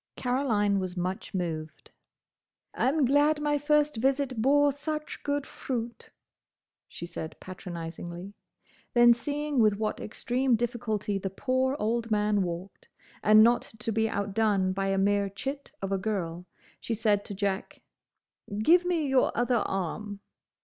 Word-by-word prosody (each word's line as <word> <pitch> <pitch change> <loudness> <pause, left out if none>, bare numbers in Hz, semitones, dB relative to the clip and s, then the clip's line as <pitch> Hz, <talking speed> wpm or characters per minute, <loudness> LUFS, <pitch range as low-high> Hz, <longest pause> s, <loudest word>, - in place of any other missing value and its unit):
Caroline 225 -6 +1
was 185 -1 -4
much 185 +2 -3
moved. 160 -4 -4 0.8
"I'm 280 +2 +2
glad 290 +3 +3
my 295 -1 +1
first 295 -2 +2
visit 265 -1 0
bore 285 +3 +4
such 305 +2 -5
good 285 -1 -1
fruit," 240 -2 -5 0.8
she - - -8
said 160 -2 -7
patronisingly. 175 +1 -7 0.6
Then 240 0 +8
seeing 290 +3 -2
with 215 -3 +4
what 215 0 -2
extreme 245 +3 0
difficulty 220 -4 -2
the 195 - -3
poor 260 +6 0
old 230 0 -1
man 210 -1 +2
walked, 175 +1 -5 0.3
and 215 +1 +7
not 235 0 +2
to 225 - -2
be 220 +1 +1
outdone 200 -2 +1
by 195 0 -1
a 195 0 +1
mere 200 +1 +2
chit 275 +8 -5
of 195 - -2
a 195 - +1
girl, 180 -4 -3 0.3
she 230 - -3
said 210 -2 +2
to 200 - -6
Jack, 195 0 -3 0.7
"Give 345 +12 +5
me 345 -4 +1
your 265 -1 +3
other 240 -1 +2
arm." 200 +2 -3
220 Hz, 140 wpm, -28 LUFS, 195-265 Hz, 0.8 s, Then